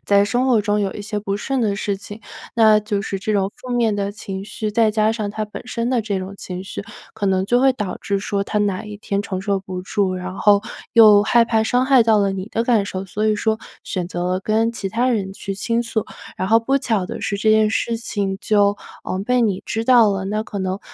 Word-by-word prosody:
在 200 0 +4
生 245 +5 0
活 230 -4 +4
中 205 0 0
有 195 -1 -1
一 205 - -6
些 210 0 -3
不 200 -1 -2
顺 265 +4 -2
的 205 -3 0
事 200 -1 -2
情。 205 +2 -10 0.4
那 215 -2 +6
就 210 -1 -2
是 195 0 -3
这 215 - -1
种 195 -1 +1
负 255 - -11
面 230 -3 +2
的 200 0 -2
情 195 -1 -6
绪， 215 +1 -4
再 220 0 +3
加 215 +1 +2
上 215 -3 -3
他 215 0 -3
本 210 - -9
身 235 -1 -2
的 250 - +2
这 205 -3 -2
种 190 +1 -6
情 185 -1 -7
绪， 195 - -6 0.3
可 220 -2 -4
能 190 -1 +2
就 245 +3 +3
会 265 0 +5
导 205 -7 -4
致 200 -1 -1
说 200 0 -2
他 210 +1 -2
哪 200 -1 -1
一 210 -1 -8
天 200 0 -2
承 185 -2 -4
受 195 -1 -1
不 185 -1 -6
住， 190 -1 0
然 185 0 -5
后 205 -1 +5 0.3
又 210 -3 +8
害 235 +2 +4
怕 225 -1 +1
伤 250 +3 +1
害 265 -3 +6
到 220 -2 +4
了 200 -1 +1
你 190 +2 -5
的 230 +1 -1
感 230 -5 +3
受， 190 -1 -4
所 205 +4 -2
以 215 -1 +2
说 220 +1 0 0.3
选 180 -2 -3
择 180 +1 -2
跟 225 +2 +1
其 200 -4 -4
他 240 +6 0
人 200 -5 -1
去 195 0 -6
倾 230 +4 -1
诉。 225 -2 -2 0.3
然 185 - -2
后 225 +1 +6
不 270 +4 +1
巧 220 -8 -1
的 - - -6
是 200 - -2
这 215 +2 +2
件 215 0 +4
事 230 +1 -1
情 200 -4 -3
就， 205 -1 +2 0.3
嗯， 185 +1 -2
被 250 +1 +2
你 200 -4 0
知 225 0 -2
道 235 -4 +6
了。 195 -1 -2
那 215 +2 -1
可 205 -2 -6
能， 190 +1 -2
210 Hz, 265 characters per minute, -20 LUFS, 195-225 Hz, 0.4 s, 又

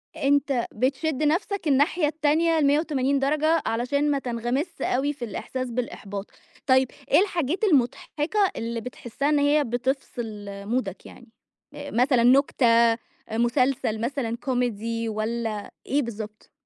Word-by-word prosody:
أنت 275 -3 +1
بتشد 275 +5 0
نَفسك 345 +3 0
الناحية 295 +3 +3
التانية 315 +2 +2
ال180 280 -2 +2
درجة 305 +3 +2
علشان 280 +6 0
ما 280 - +1
تنغمسش 250 +7 -3
أوي 275 +4 0
في 265 -4 -6
الإحساس 255 +3 -5
بالإحباط. 205 -4 -5 0.4
طيب 260 -1 +5 0.2
إيه - - +7
الحاجات 355 -2 0
المضحِكة 300 - +1 0.2
اللي 230 0 -3
بتحسّها 250 +3 -3
إن 295 -1 +3
هي 290 +1 +3
بتفْصِل 240 -4 -3 0.2
مودك 215 -4 -3
يعني؟ 245 - -13 0.5
آآ 285 0 -7
مثلًا 245 +1 +3
نُكتة، 265 0 +4
آآ 230 0 +5 0.3
مسلسل 240 -1 +1
مثلًا 240 -2 -2
كوميدي 230 -3 -2
والّا 220 -1 -3
إيه 290 +2 +1
بالضبط؟ 215 -3 -7
260 Hz, 125 wpm, -25 LUFS, 235-290 Hz, 0.5 s, إيه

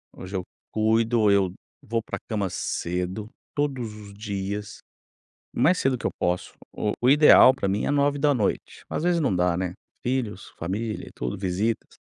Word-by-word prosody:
Hoje 95 +1 -7
eu 95 - -1 0.3
cuido, 110 0 +3
eu 95 -2 +3 0.3
vou 115 +1 -2
pra - - -5
cama 100 -4 -1
cedo, 90 +5 -3 0.3
todos 135 -7 -1
os 100 -1 -11
dias, 100 +1 -4 0.8
o - - -3
mais 180 - +4
cedo 130 -1 +2
que - - -4
eu - - +1
posso. 90 +1 -1 0.2
O 105 - -1
o 125 +2 +4
ideal 145 -3 +8
pra 100 - -2
mim 100 +2 0
é - - 0
21:00, 145 -4 +1
às - - -2
vezes 175 -1 +2
não 135 -10 +1
dá, 90 -1 +2
né, 90 0 -2 0.3
filhos, 120 -6 -2
família 105 +6 -3
e - - -18
tudo, 60 +7 -4
visitas. 100 +4 -2
105 Hz, 170 wpm, -25 LUFS, 95-125 Hz, 0.8 s, ideal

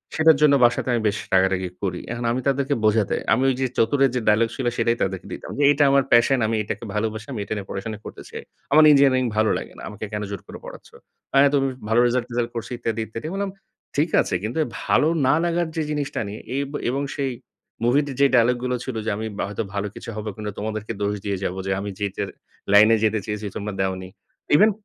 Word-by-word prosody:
সেটার 160 -2 +5
জন্য 150 -2 +6
বাসাতে 120 +1 +1
আমি 120 - +1
বেশ 105 - 0 0.2
রাগারাগি 95 -1 +2
করি। 95 - -1
এখন 120 0 -4
আমি 130 +2 -1
তাদেরকে 140 +1 +1
বোঝাতে, 105 -1 +2 0.2
আমি 130 - +2
ওই 130 - +1
যে - - +2
চতুরে 135 +5 +3
যে 125 - +2
ডায়ালগ 110 +2 +4
ছিল 130 - -4
সেটাই 115 0 +1
তাদেরকে 95 -1 -3
দিতাম, - - -8
যে - - +3
"এটা 145 +1 +3
আমার 140 -1 +4
passion 120 +2 +5
আমি 115 - 0
এটাকে 105 +2 -5
ভালোবাসি, 110 0 -2
আমি 115 - -4
এটা - - -3
নিয়ে 100 -2 -6
পড়াশোনা 105 +2 -5
করতে - - -9
চাই। - - -8 0.3
আমার 155 +2 +7
ইঞ্জিনিয়ারিং 135 -2 +5
ভালো 110 0 +3
লাগে - - -8
না - - -10
আমাকে 105 +1 -6
কেন 105 - -2
জোর 100 - -5
করে - - -9
পড়াচ্ছো?" - - -12 0.4
অ্যা 140 +1 +6
তো - - +4
বেশ 135 -1 -1 0.2
ভালো 115 +2 +4
রেজাল্ট-টেজাল্ট 120 -1 -1
করছি 115 +1 -5
ইত্যাদি, 115 -2 -2
ইত্যাদি। 115 +5 -7
আমি - - -6
বললাম, 200 -1 -2 0.4
"ঠিক 155 +3 +2
আছে - - -2
কিন্তু 110 +7 -3 0.3
ভালো 150 - +3 0.2
না - - +5
লাগার 170 0 0
যে 160 - 0
জিনিসটা 145 -2 -2
নিয়ে" 105 +2 -7 0.2
এব 140 0 -2 0.2
এবং 135 +3 -1
সেই 135 -2 -1 0.5
মুভিতে 140 +4 +2
যে - - +7
ডায়ালগ 120 +1 +4
গুলো 125 0 0
ছিল 130 -3 -5
যে, - - 0
"আমি 110 +1 -3
বা - - -1
হয়তো 105 +2 -3
ভালো 100 0 -2
কিছু - - -8
হবে 110 0 -4 0.3
তোমাদেরকে 110 +1 -4
দোষ 100 0 0
দিয়ে 100 -2 -1
যাবো 95 0 -2
যে - - 0
আমি 100 +1 -4
যেটা 100 -2 -2 0.5
লাইনে 110 +2 +7
যেতে 110 0 +2
চেয়েছি 105 0 -4
তোমরা 105 0 -4
দেওনি।" 95 -1 -2 0.5
ইভেন 215 +8 +6
115 Hz, 220 wpm, -23 LUFS, 105-135 Hz, 0.5 s, আমার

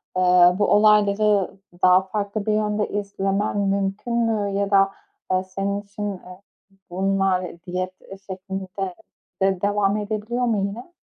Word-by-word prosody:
aaa, 180 0 +5
bu 205 - +3
olayları 210 -1 +3 0.3
daha 185 0 +6
farklı 200 +2 -4
bir 215 - +1
yönde 210 0 0
izlemen 200 0 -1
mümkün 200 +3 -1
mü 220 -3 +1
ya 200 0 -1
da, 195 0 +4 0.4
aaa, 185 0 +1
senin 195 +2 -3
için, 205 0 -5
eee, 180 0 -12 0.5
bunlar 185 -2 0
diyet, 185 +1 -4
eee, 195 - -11
şeklinde 190 0 -6 0.7
de 190 -1 +2
devam 205 0 +1
edebiliyor 215 +4 -2
mu 225 -3 +1
yine? 240 +12 -9
200 Hz, 135 wpm, -23 LUFS, 190-210 Hz, 0.7 s, daha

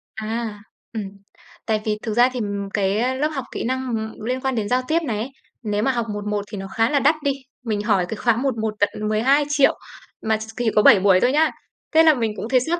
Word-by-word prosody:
À, 220 -1 -4 0.3
ừm. 220 -3 -4 0.6
Tại 215 -1 0
vì 210 -1 0
thực 220 - -2
ra 245 +2 +5
thì 250 - -3 0.3
cái 215 +6 +1
lớp 300 - +2
học 270 -4 -4
kỹ - - -4
năng, 260 +2 -2
ưm, 220 0 -5
liên 255 +2 -2
quan 265 -1 -1
đến 210 -2 -2
giao 250 +1 +2
tiếp 325 +2 +2
này 225 -5 -2
ấy, 235 +5 -3 0.3
nếu 210 0 -1
mà 270 - +3
học 235 -3 -1
1:1 205 0 -3
thì 210 - -5
nó 195 0 -6
khá 225 +1 +3
là 290 - +2
đắt 290 +4 +4
đi. 285 - +2 0.3
Mình 215 -4 -1
hỏi 205 -4 +2
cái - - -3
khóa 235 -1 +2
một 260 -1 -1
một 220 -1 -1
tận 205 - +3 0.2
12.000.000 275 +6 +3 0.5
mà 220 0 +1
ch 215 - -7
thì 240 -2 +1
có 210 - +6
7 205 - +8
buổi 190 -1 +5
thôi 245 - +3
nhá. 310 +3 +3 0.4
Thế 320 +1 +6
là 315 -1 +7
mình 225 -5 -1
cũng 225 - -5
thấy 260 - +4
xót 330 +7 -1
230 Hz, 245 wpm, -22 LUFS, 215-260 Hz, 0.6 s, 7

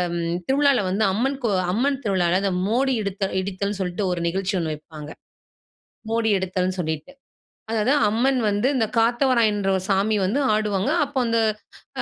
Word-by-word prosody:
ம் 170 0 -2
திருவிழால 280 -1 +3
வந்து 200 +4 0
அம்மன் 265 +6 0
கோ 230 - +1 0.2
அம்மன் 270 +8 +1
திருவிழால 185 -3 +1
இந்த 195 - +1 0.2
மோடி 260 +5 +1
எடுத்தல் 200 -1 -3
இடித்தல்ன்னு 200 +1 -3
சொல்லிட்டு 180 +2 -2
ஒரு 175 - -2
நிகழ்ச்சி 190 +3 -1
ஒண்ணு 160 -2 -2
வைப்பாங்க. 150 0 -10 1.0
மோடி 225 0 +1
எடுத்தல்ன்னு 185 0 -2
சொல்லிட்டு. 160 - -3 0.6
அதாவது 225 +5 +2 0.2
அம்மன் 250 +5 +1
வந்து 205 +4 +1
இந்த 235 -4 +2
காத்தவராயன்ன்ற 230 -4 +2
ஒரு 185 - -5
சாமி 200 +2 +2
வந்து 210 +10 0
ஆடுவாங்க. 210 +1 0 0.2
அப்ப 280 - -15
அந்த 230 0 +1 0.6
ஹ - - +1
205 Hz, 155 wpm, -23 LUFS, 185-235 Hz, 1.0 s, திருவிழால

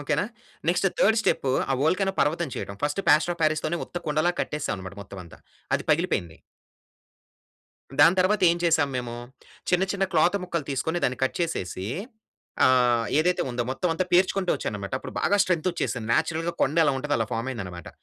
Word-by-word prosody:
Okay 145 +1 -1
నా? - - 0 0.4
Next 180 +2 +2
third 220 +2 +4
step 140 -9 0 0.2
ఆ - - +3
volcano 190 +5 +1
పర్వతం 165 +1 +1
చేయడం 100 - -5
ఫస్ట్ 145 +6 0
ప్లాస్టర్ 155 +3 +4
ఆఫ్ 170 - -22
పారిస్‌తోనే 155 +2 +1
ఉత్త - - -13
కుండలా 155 +4 +1
కట్టేసాం 150 -6 -3
అన్నమాట 95 +1 -9
మొత్తం 100 -1 -10
అంతా. 85 - -15 0.4
అది - - -1
పగిలిపోయింది. 85 -2 0 1.6
దాని 165 +5 +7
తర్వాత 190 +2 +2
ఏం 170 - +1
చేసాము 160 -4 +3
మేము? 120 -1 -4 0.5
చిన్న 180 +1 +3
చిన్న 195 -1 0
క్లాత్ 170 +5 +3
ముక్కలు 170 -4 -3
తీసుకొని 150 +6 -1
దాన్ని 125 0 0
కట్ - - -2
చేసేసి 95 - -3 0.8
ఆహ్, 125 -2 +4
ఏదైతే 180 +3 +2
ఉందో 120 0 -1
మొత్తం 155 +7 -1
అంతా 180 +3 -1
పేర్చుకుంటూ 185 +1 +3
వచ్చాననమాట 100 0 -5
అప్పుడు - - -9
బాగా 205 - +2
స్ట్రెంత్ 175 -2 -1
వచ్చేసింది. 125 -9 -3
నేచురల్‌గా 165 +1 0
కొండ 145 +4 +1
ఎలా 145 -3 +3
ఉంటదో 145 +2 -1
అలా 115 - -1
ఫార్మ్ 115 +3 -2
అయిందనమాట. 90 -8 -7
155 Hz, 175 wpm, -25 LUFS, 125-175 Hz, 1.6 s, దాని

